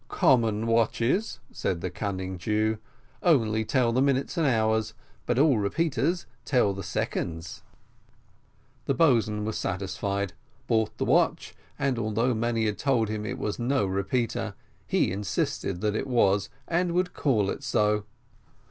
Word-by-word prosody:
"Common 115 -3 +3
watches," 115 - +1
said 85 -3 -2
the 90 - -3
cunning 95 -2 -4
Jew, 110 +3 0 0.4
"only 110 -10 +3
tell 120 +1 +2
the 125 +3 +2
minutes 135 -1 +1
and 165 -3 +2
the - - +4
hours; 110 -1 +1 0.3
but 120 - +1
all 140 -4 +4
repeaters 165 - 0 0.2
tell 125 -6 +2
the 100 - -6
seconds." 85 -2 -3 1.2
The - - +1
boatswain 110 -9 +3
was 110 0 -2
satisfied 100 +1 -2 0.3
bought 110 -2 0
the - - -1
watch, - - +2 0.2
and, 135 -3 0
although 115 +3 +1
many 115 0 0
had 105 -1 -1
told 125 -6 +1
him 105 0 -3
it 125 - -4
was 105 -5 -3
no 120 -2 +1
repeater, 100 +5 -1 0.3
he - - +2
insisted 95 -1 -2
that 105 -1 0
it - - -2
was, 100 -6 +2 0.2
and 175 0 +1
would 180 0 0
call 110 -9 +1
it - - -6
so. 105 0 +1
110 Hz, 150 wpm, -27 LUFS, 100-130 Hz, 1.2 s, the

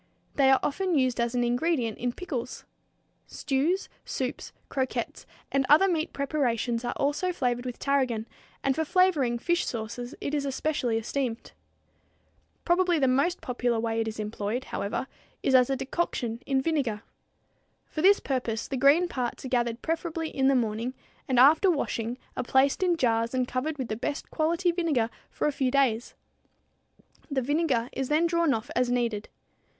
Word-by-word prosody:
They 275 -2 +4
are 265 - +6
often 365 +2 0
used 255 -2 +1
as 235 +1 0
an 245 - +2
ingredient 245 -1 0
in 245 0 0
pickles. 255 -6 -5 0.6
Stews, 305 +8 0 0.2
soups, 255 -1 -4 0.2
croquettes, 260 -1 -3 0.2
and 275 0 +2
other 315 +7 +7
meat 335 -2 0
preparations 250 -5 -1
are 240 - -2
also 295 +6 0
flavored 245 -6 -1
with 245 - -5
tarragon, 255 -6 0 0.4
and 270 -1 +2
for 320 - 0
flavoring 310 -8 +2
fish 345 +8 +1
sauces 235 +2 -5
it 285 - -4
is 290 -2 0
especially 270 -3 -1
esteemed. 235 +1 -3 1.1
Probably 350 0 +3
the 270 -3 +3
most 280 +8 +1
popular 245 -2 -1
way 225 0 0
it 225 - -2
is 220 0 -5
employed, 215 +3 -3
however, 200 +1 -3 0.4
is 265 - +2
as 255 -1 +6
a 270 - +1
decoction 260 -4 -2
in 265 -1 +1
vinegar. 265 -10 -1 0.8
For 310 - -5
this 400 +4 +6
purpose, 240 -5 -2
the 270 - -3
green 285 +7 +5
parts 250 -5 -4
are - - -4
gathered 240 -2 0
preferably 325 0 -2
in 265 -1 +1
the 275 - +4
morning 230 +1 -1 0.3
and 255 - +1
after 310 +8 +6
washing 245 -7 -1 0.2
are - - -1
placed 265 +5 +2
in 355 -2 +2
jars 230 -2 +1
and 255 -1 +1
covered 285 +5 -2
with 260 -3 -3
the 215 - -1
best 285 +6 -4
quality 335 +3 +1
vinegar 305 -10 0 0.2
for - - -3
a 300 - +3
few 270 -2 0
days. 255 -4 +1 1.1
The 270 -3 0
vinegar 280 -4 +1
is 265 -1 -3
then 310 +3 +3
drawn 335 -2 +2
off 220 -4 -2
as 250 0 +2
needed. 235 -4 -1
265 Hz, 165 wpm, -27 LUFS, 240-310 Hz, 1.1 s, other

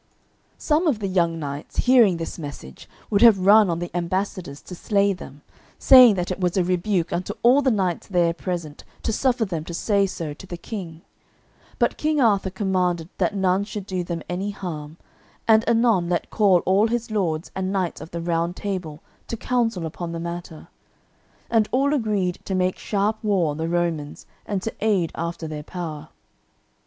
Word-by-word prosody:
Some 315 +3 +1
of 280 -8 +2
the 210 - -4
young 170 -3 +1
knights 145 -1 -6
hearing 235 -8 +5
this 165 +1 -6
message 140 - -9 0.2
would 200 -1 +2
have 230 -4 +8
run 210 0 +7
on 165 - 0
the 175 0 -6
ambassadors 175 -4 -3
to - - -10
slay 200 +2 +1
them, 145 -5 -11 0.3
saying 250 -5 +8
that 180 0 -2
it 185 - -4
was 180 0 0
a 185 - +3
rebuke 180 0 0
unto 180 +1 -3
all 250 +4 +6
the 265 - +2
knights 190 -7 -1
there 175 -3 +2
present 170 -4 -5 0.2
to 225 - -1
suffer 245 -1 +1
them 170 -6 -4
to 170 - -6
say 200 +1 +2
so 165 -5 -5
to 190 - -13
the 175 - -6
King. 170 -4 -7 0.7
But - - 0
King 305 0 +1
Arthur 205 -6 +3
commanded 180 -3 -1
that 185 +1 +1
none 190 0 +2
should 205 -1 -6
do 185 -2 -3
them 170 -1 -5
any 185 +3 -3
harm, 160 -6 -6 0.5
and 220 -1 +5
anon 225 -7 +3
let 175 - -1
call 195 -5 +3
all 195 +4 +3
his 235 0 -3
lords 170 -6 -1
and 190 0 -2
knights 185 -3 -2
of - - -9
the 170 0 -5
Round 170 +1 -1
Table 180 -7 -5 0.2
to 230 - -4
council 225 -8 -1
upon 170 +1 -5
the 165 - -4
matter. 170 -1 -7 0.8
And 225 -2 +2
all 275 +3 +2
agreed 210 -9 0
to 190 - -2
make 185 0 0
sharp 210 +2 -1
war 190 -7 +1
on 145 - -6
the 160 +1 -2
Romans, 170 -4 -2 0.2
and 195 -3 -2
to 225 - -3
aid 200 -6 +1
after 170 0 -4
their 155 -1 -5
power. 155 -2 -7
185 Hz, 185 wpm, -23 LUFS, 170-210 Hz, 0.8 s, have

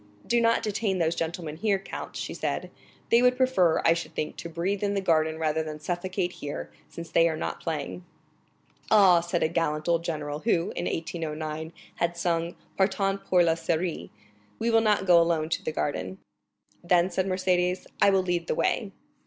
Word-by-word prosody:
"Do 235 0 +2
not 230 0 +3
detain 205 -2 -1
those 165 -2 +1
gentlemen 165 -2 -4
here, 200 +2 +1
count," 195 - -8
she - - -4
said; - - -3 0.4
"they 235 - +6
would 250 0 +4
prefer, 255 -11 +3
I 165 - +6
should 165 0 -6
think, 155 - -3
to 170 - -6
breathe 180 +5 -2
in 205 -1 0
the - - +1
garden 160 -4 +1
rather 160 0 0
than 155 -1 -6
suffocate 180 +3 -2
here, 75 - -6 0.2
since 170 -1 -9
they 165 +1 +4
are 160 - -3
not - - -4
playing." 160 +2 -4 0.9
"Ah," 195 -5 +7
said 175 0 -1
a - - +3
gallant 155 -1 -1
old 170 -1 +2
general, 150 -3 -3
who, 175 -4 +1
in 175 - -2
1809, 160 -1 -4 0.3
had 170 0 -1
sung 170 0 -1 0.2
Partant 195 0 +1
pour 180 -1 +4
la 165 -1 +3
Syrie,—"we 155 - -4
will 225 0 +5
not 210 -3 +2
go 175 -2 +7
alone 165 -2 +1
to - - -1
the - - -2
garden." 95 -12 -3 0.7
"Then," 175 +1 +3
said 190 +2 0
Mercédès, 185 -1 +1 0.2
"I - - +7
will 190 -1 +3
lead 175 -2 -1
the - - 0
way." 200 -4 0
170 Hz, 185 wpm, -27 LUFS, 160-190 Hz, 0.9 s, Ah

